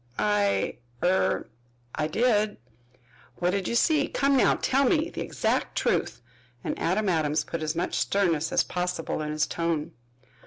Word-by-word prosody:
"I 205 Hz, -1 st, +1 dB, 0.3 s
er 185 Hz, +2 st, +2 dB, 0.5 s
I 155 Hz, 0 st, -1 dB
did." 215 Hz, +3 st, +1 dB, 0.8 s
"What 175 Hz, 0 st, 0 dB
did 195 Hz, -1 st, -1 dB
you -, -, -1 dB
see? 300 Hz, +3 st, +3 dB
Come 275 Hz, 0 st, +1 dB
now, 260 Hz, -, +4 dB
tell 270 Hz, +2 st, +1 dB
me 315 Hz, +4 st, +2 dB
the -, -, -5 dB
exact -, -, -1 dB
truth," 120 Hz, -, 0 dB, 0.4 s
and -, -, -2 dB
Adam 200 Hz, +5 st, 0 dB
Adams 155 Hz, -4 st, +1 dB
put 165 Hz, -, -5 dB
as 155 Hz, +1 st, -2 dB
much 175 Hz, +2 st, -1 dB
of -, -, -2 dB
sternness 165 Hz, -6 st, +1 dB
as -, -, +3 dB
possible 180 Hz, -3 st, -3 dB
in 150 Hz, -, -3 dB
his 155 Hz, 0 st, +1 dB
tone. 165 Hz, -3 st, -2 dB
180 Hz, 160 wpm, -27 LUFS, 160-215 Hz, 0.8 s, now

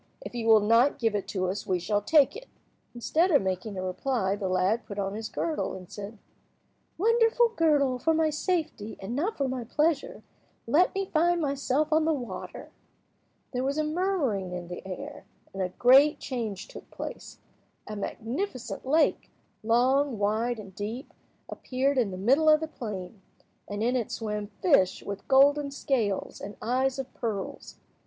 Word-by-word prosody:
If -, -, -8 dB
you 235 Hz, -2 st, -3 dB
will 220 Hz, -1 st, +7 dB
not 230 Hz, +6 st, +4 dB
give 225 Hz, -5 st, +1 dB
it 205 Hz, -2 st, -2 dB
to 185 Hz, -2 st, -2 dB
us 190 Hz, +3 st, -4 dB
we 185 Hz, -, +2 dB
shall 205 Hz, +4 st, 0 dB
take 285 Hz, +4 st, +4 dB
it." -, -, -9 dB, 0.5 s
Instead 320 Hz, +9 st, +1 dB
of 285 Hz, -, +4 dB
making 190 Hz, +2 st, -3 dB
a 185 Hz, -, -3 dB
reply, 195 Hz, +1 st, -1 dB
the 200 Hz, -2 st, -3 dB
lad 190 Hz, +5 st, +1 dB
put 200 Hz, -, -7 dB
on 195 Hz, -1 st, -2 dB
his 220 Hz, +1 st, -5 dB
girdle, 320 Hz, -2 st, -2 dB
and 185 Hz, -2 st, -11 dB
said— 205 Hz, +2 st, -8 dB, 0.8 s
"Wonderful 460 Hz, +4 st, +4 dB
girdle, 295 Hz, -, +2 dB
for 325 Hz, -, +2 dB
my 320 Hz, -1 st, +2 dB
safety, 310 Hz, -, -2 dB
and 205 Hz, +5 st, -5 dB
not 360 Hz, +11 st, -1 dB
for 275 Hz, -, 0 dB
my 255 Hz, -1 st, -3 dB
pleasure, 325 Hz, -, 0 dB, 0.4 s
let 315 Hz, +12 st, +3 dB
me 390 Hz, 0 st, 0 dB
find 345 Hz, 0 st, +2 dB
myself 285 Hz, 0 st, 0 dB
on 315 Hz, 0 st, +3 dB
the 320 Hz, -1 st, +2 dB
water." 235 Hz, -9 st, -7 dB, 0.8 s
There 250 Hz, -1 st, -2 dB
was 275 Hz, +2 st, -1 dB
a 310 Hz, -, +2 dB
murmuring 305 Hz, -, -1 dB
in 175 Hz, -1 st, -6 dB
the 175 Hz, -, -7 dB
air, 185 Hz, -, -7 dB, 0.3 s
and 195 Hz, -, -4 dB
a 185 Hz, -, 0 dB
great 265 Hz, +9 st, +5 dB
change 225 Hz, -7 st, -4 dB
took -, -, -12 dB
place. -, -, -8 dB, 0.5 s
A 215 Hz, -, -6 dB
magnificent 245 Hz, -, -4 dB
lake—long, 265 Hz, -3 st, +1 dB
wide, 220 Hz, +4 st, 0 dB
and 195 Hz, -3 st, -10 dB
deep—appeared 255 Hz, -, -4 dB
in 230 Hz, -5 st, +1 dB
the 185 Hz, -, -6 dB
middle 270 Hz, +11 st, +4 dB
of 305 Hz, 0 st, +6 dB
the 320 Hz, -, -3 dB
plain, 205 Hz, -, -7 dB, 0.5 s
and 205 Hz, +1 st, -3 dB
in 245 Hz, +2 st, +1 dB
it 240 Hz, -4 st, -1 dB
swam 210 Hz, -2 st, -3 dB, 0.2 s
fish 235 Hz, -, +3 dB
with 200 Hz, -1 st, -7 dB
golden 280 Hz, +2 st, +5 dB
scales 240 Hz, -8 st, -2 dB
and 205 Hz, -, -8 dB
eyes 260 Hz, +3 st, 0 dB
of 265 Hz, -1 st, -6 dB
pearls. 210 Hz, -5 st, -5 dB
245 Hz, 170 wpm, -28 LUFS, 205-300 Hz, 0.8 s, will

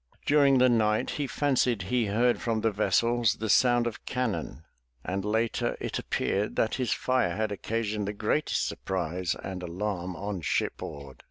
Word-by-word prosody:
During 140 Hz, -2 st, +5 dB
the 130 Hz, 0 st, +6 dB
night 110 Hz, -3 st, +2 dB
he 145 Hz, -2 st, -2 dB
fancied 125 Hz, -7 st, +1 dB
he 115 Hz, +3 st, 0 dB
heard 120 Hz, +4 st, +2 dB
from 115 Hz, -2 st, 0 dB
the 115 Hz, -, +2 dB
vessels 115 Hz, +2 st, +2 dB
the 110 Hz, 0 st, -4 dB
sound 120 Hz, +2 st, +4 dB
of 120 Hz, +1 st, -4 dB
cannon, 110 Hz, -, -3 dB, 0.4 s
and 95 Hz, +1 st, -2 dB
later 110 Hz, +2 st, 0 dB
it -, -, -3 dB
appeared 105 Hz, +2 st, -1 dB
that 110 Hz, -, +1 dB
his 125 Hz, -, 0 dB
fire 125 Hz, -10 st, +1 dB
had 110 Hz, 0 st, -1 dB
occa 105 Hz, +4 st, -2 dB
sioned 105 Hz, -1 st, -2 dB
the 105 Hz, -, -2 dB
greatest 110 Hz, +9 st, 0 dB
surprise 90 Hz, -1 st, -2 dB
and 95 Hz, -1 st, -5 dB
alarm 90 Hz, 0 st, -3 dB
on 100 Hz, -1 st, -4 dB
shipboard. 70 Hz, -3 st, -3 dB
110 Hz, 165 wpm, -28 LUFS, 95-120 Hz, 0.4 s, the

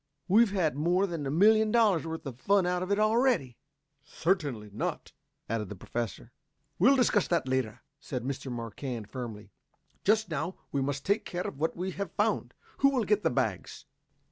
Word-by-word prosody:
"We've 220 Hz, +4 st, +5 dB
had 180 Hz, -8 st, 0 dB
more 175 Hz, +6 st, +2 dB
than 165 Hz, -7 st, -4 dB
a -, -, -1 dB
million 215 Hz, +7 st, +4 dB
dollars 210 Hz, -9 st, +3 dB
worth 160 Hz, -1 st, -5 dB
of 130 Hz, -3 st, -7 dB
fun 200 Hz, +2 st, +3 dB
out 180 Hz, 0 st, 0 dB
of 185 Hz, +2 st, -3 dB
it 200 Hz, -, +3 dB
already." 215 Hz, -, +2 dB, 0.5 s
"Certainly 145 Hz, -, -1 dB
not," -, -, -3 dB, 0.4 s
added 110 Hz, -3 st, -2 dB
the 105 Hz, -, -6 dB
Professor. 115 Hz, +4 st, -5 dB, 0.5 s
"We'll 275 Hz, +2 st, +6 dB
discuss 240 Hz, -6 st, +3 dB
that 170 Hz, -6 st, 0 dB
later," 125 Hz, -3 st, -1 dB, 0.2 s
said 125 Hz, -5 st, -5 dB
Mr. 135 Hz, 0 st, -4 dB
Marquand 115 Hz, -1 st, -5 dB
firmly. 110 Hz, -6 st, -7 dB, 0.5 s
"Just 215 Hz, -2 st, +2 dB
now 160 Hz, +5 st, -2 dB, 0.2 s
we 140 Hz, -, 0 dB
must 140 Hz, 0 st, -2 dB
take 200 Hz, +2 st, +2 dB
care 175 Hz, 0 st, -4 dB
of 135 Hz, -, -6 dB
what 160 Hz, +2 st, -1 dB
we 185 Hz, +2 st, -2 dB
have 200 Hz, +2 st, -4 dB
found. -, -, 0 dB, 0.2 s
Who 275 Hz, -, +5 dB
will 260 Hz, -4 st, +1 dB
get 210 Hz, +1 st, +2 dB
the -, -, +2 dB
bags?" -, -, -2 dB
165 Hz, 180 wpm, -29 LUFS, 130-200 Hz, 0.5 s, We'll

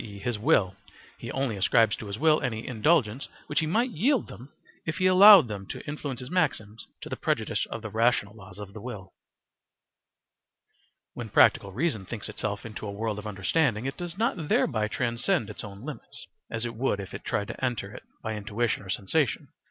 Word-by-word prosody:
e., 105 Hz, -3 st, -9 dB
his 110 Hz, +2 st, -3 dB
will: 95 Hz, -3 st, +3 dB, 0.4 s
he -, -, -6 dB
only 135 Hz, -5 st, -1 dB
ascribes 110 Hz, +2 st, +3 dB
to 110 Hz, -, -8 dB
his 100 Hz, +1 st, -5 dB
will 155 Hz, +2 st, +4 dB
any 115 Hz, -5 st, -3 dB
indulgence 130 Hz, 0 st, +1 dB, 0.2 s
which -, -, 0 dB
he 160 Hz, -, 0 dB
might 235 Hz, +9 st, +1 dB
yield 240 Hz, -, +1 dB
them 130 Hz, +5 st, -11 dB, 0.3 s
if 160 Hz, 0 st, -3 dB
he 185 Hz, -, +1 dB
allowed 185 Hz, -, +9 dB
them 100 Hz, -3 st, -5 dB
to -, -, -7 dB
influence 145 Hz, -3 st, -4 dB
his 125 Hz, +4 st, -7 dB
maxims 115 Hz, -, -1 dB
to -, -, -7 dB
the -, -, -4 dB
prejudice -, -, -1 dB
of 115 Hz, -, -6 dB
the 110 Hz, -, -4 dB
rational 110 Hz, -3 st, +2 dB
laws 95 Hz, -3 st, -13 dB
of 100 Hz, -1 st, -9 dB
the 110 Hz, -, -9 dB
will. 100 Hz, -6 st, -8 dB, 2.0 s
When -, -, -6 dB
practical 100 Hz, -, +4 dB
reason 115 Hz, -, -1 dB
thinks 110 Hz, -2 st, -6 dB
itself 105 Hz, -1 st, -4 dB
into 110 Hz, -1 st, -6 dB
a -, -, -4 dB
world 105 Hz, +1 st, -3 dB
of 105 Hz, -, -7 dB
understanding, 105 Hz, +4 st, 0 dB
it 135 Hz, -, -3 dB
does 175 Hz, 0 st, -6 dB
not 195 Hz, -8 st, -1 dB
thereby 110 Hz, -3 st, +2 dB
transcend 120 Hz, -, 0 dB
its -, -, -7 dB
own 100 Hz, 0 st, -9 dB
limits, 150 Hz, -7 st, -7 dB, 0.2 s
as 115 Hz, +1 st, -2 dB
it 120 Hz, -, -4 dB
would 115 Hz, -3 st, 0 dB
if 95 Hz, -, -7 dB
it -, -, -7 dB
tried 100 Hz, -, -2 dB
to -, -, -7 dB
enter 115 Hz, -5 st, -2 dB
it -, -, -9 dB, 0.2 s
by 110 Hz, -, -2 dB
intuition 105 Hz, +3 st, -1 dB
or 95 Hz, -, -12 dB
sensation. 115 Hz, +9 st, 0 dB
115 Hz, 200 wpm, -27 LUFS, 105-150 Hz, 2.0 s, allowed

